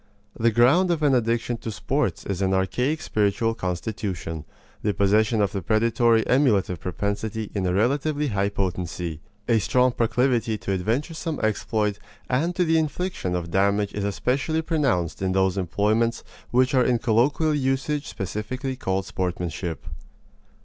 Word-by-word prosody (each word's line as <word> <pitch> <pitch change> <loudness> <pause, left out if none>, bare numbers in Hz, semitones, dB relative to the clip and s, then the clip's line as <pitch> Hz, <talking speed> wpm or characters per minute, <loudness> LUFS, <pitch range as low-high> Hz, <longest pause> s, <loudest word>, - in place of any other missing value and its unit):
The 115 - +2
ground 125 - +4
of 165 -3 0
an 145 -2 +4
addiction 120 0 +1
to 115 - -6
sports 105 - -1
is 100 -1 -3
an 95 0 +2
archaic 125 - 0
spiritual 105 +2 +1
constitution 90 -5 -4 0.4
the 105 -1 0
possession 105 +2 +3
of 100 - 0
the 100 - -3
predatory 115 +3 +2
emulative 110 - +2
propensity 105 +4 -3
in 95 -3 -1
a 90 - +1
relatively 145 +7 +1
high 100 -2 0
potency, 90 -4 -3 0.3
a 115 -1 +4
strong 125 +4 +3
proclivity 120 -1 +1
to 100 - -4
adventuresome 145 - -2
exploit 105 -1 0 0.3
and 165 +8 +1
to 180 - +2
the 160 0 +3
infliction 160 - -2
of 85 -1 -4
damage 100 +2 +1
is 105 - -3
especially 135 - 0
pronounced 135 - 0
in 95 -1 0
those 95 -1 +2
employments 105 +6 0 0.3
which 130 +2 +2
are 130 -2 +4
in 125 -1 +2
colloquial 130 +8 +2
usage 140 +2 -1
specifically 110 +7 -4
called 95 -6 -2
sportsmanship. 85 -3 -3
110 Hz, 145 wpm, -24 LUFS, 95-130 Hz, 0.4 s, ground